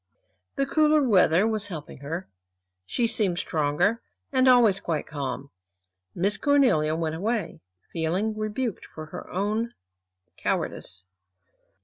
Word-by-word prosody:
The 275 - +1
cooler 305 +1 +3
weather 185 -3 +4
was 215 -2 0
helping 155 -8 -8
her. 165 +7 -5 0.6
She 240 - 0
seemed 200 -6 +1
stronger, 170 +8 0 0.3
and 260 0 +4
always 235 -6 +6
quite 160 -6 -2
calm. 140 -1 -5 0.6
Miss 200 +3 +2
Cornelia 240 - +3
went 160 -1 -2
away, 215 +7 -2 0.3
feeling 180 +7 0
rebuked 215 +1 -3
for 155 - -9
her 155 - -9
own 210 +5 -1 0.6
cowardice. 90 0 -3
195 Hz, 115 wpm, -26 LUFS, 160-230 Hz, 0.6 s, always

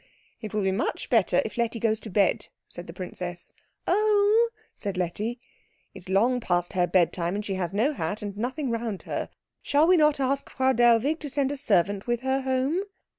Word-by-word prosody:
"It 215 -3 -6
will 210 -2 -1
be 190 - +2
much 195 +6 -2
better 205 -7 +3
if 220 +2 -6
Letty 230 0 0
goes 220 -1 +1
to 225 - -9
bed," 195 -2 +1 0.2
said 175 - -7
the - - -7
princess. 180 0 -6 0.3
"Oh!" 425 +3 +3 0.2
said 200 -3 -5
Letty. 205 +7 -2 0.5
"It - - -11
is 185 - -10
long 235 +7 +3
past 175 -5 -1
her 180 -1 +2
bedtime, 175 0 +1
and 210 0 -3
she 195 - -2
has 180 -3 -2
no 230 +10 +1
hat, 210 -6 -3
and 200 -1 -5
nothing 255 +5 -2
round 230 -4 -3
her. - - -4 0.3
Shall 290 +2 +3
we 365 +1 +5
not 300 -2 +3
ask 275 +1 -1
Frau 265 0 +1
Dellwig 240 +6 +3
to 295 - -6
send 275 0 0
a - - -2
servant 205 -5 +1
with 240 0 0
her 265 +1 0
home?" 265 +6 0
230 Hz, 200 wpm, -26 LUFS, 195-270 Hz, 0.5 s, we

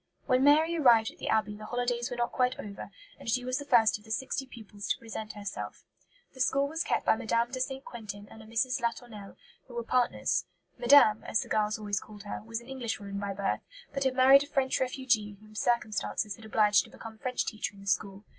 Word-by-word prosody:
When 255 +1 +3
Mary 310 +4 +5
arrived 235 -8 +5
at - - -21
the - - -4
Abbey 215 -1 +1
the 215 0 -9
holidays 245 0 -1
were 245 - -5
not 240 0 0
quite 250 -1 +1
over, 200 -1 -7 0.3
and - - -6
she 250 +2 +1
was 255 +2 -1
the 285 - -7
first 225 -6 +4
of - - -20
the 220 - -16
sixty 265 +4 -2
pupils 210 -4 -9
to - - +1
present 220 -1 -7
herself. 205 -2 -6 0.5
The 260 - -15
school 275 +2 +2
was 320 +3 -2
kept - - 0
by - - +5
Mme. 230 +2 0
de 260 - -4
St. 265 +1 -3
Quentin 205 -3 -8
and 220 - -12
a 220 - -13
Mrs. 230 +3 0
Latournelle, 230 -4 -4 0.3
who 245 - -11
were 235 - -2
partners. 250 +1 +1 0.3
"Madame," 240 -4 +6
as - - +1
the - - -8
girls 210 0 +1
always 205 -2 -2
called 210 -2 -12
her, 205 - -5
was 225 +1 -4
an 235 - -16
Englishwoman 225 -6 -4
by 200 0 -3
birth, 195 0 -1 0.3
but 275 0 -1
had 265 -1 +1
married 265 +2 +8
a 285 - -4
French 265 -2 +1
refugee 250 -6 0
whom 215 0 -17
circumstances 215 -2 -1
had 225 - -14
obliged 210 -1 +4
to - - -15
become 220 -1 -11
French 250 +1 -1
teacher 215 -2 -4
in 195 - -14
the - - -12
school. 200 +1 -1
230 Hz, 225 wpm, -30 LUFS, 210-255 Hz, 0.5 s, married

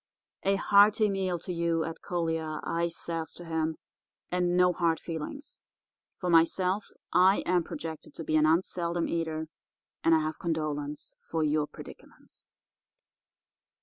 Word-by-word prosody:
"'A 195 +1 +4
hearty 205 +2 +5
meal 190 -2 -1
to 180 +2 -5
you, 170 -1 0
Ed 165 0 -6
Collier,' 165 -3 -2
I 170 +1 0
says 165 -1 -4
to 175 - -11
him, 160 -1 -1 0.6
'and 180 0 +1
no 180 0 +5
hard 165 -2 +1
feelings. 165 - -7 0.6
For 180 - -4
myself, 180 +4 +3 0.3
I 185 +3 +5
am 180 -1 +2
projected 160 -1 -7
to 165 - -5
be 155 - 0
an 155 0 +5
unseldom 170 +1 +1
eater, 160 -1 -2 0.6
and 165 - +5
I 160 - +3
have 155 0 -3
condolence 150 -3 -3
for 160 -1 -2
your 150 0 +1
predicaments. - - -13
165 Hz, 140 wpm, -29 LUFS, 160-180 Hz, 0.6 s, hearty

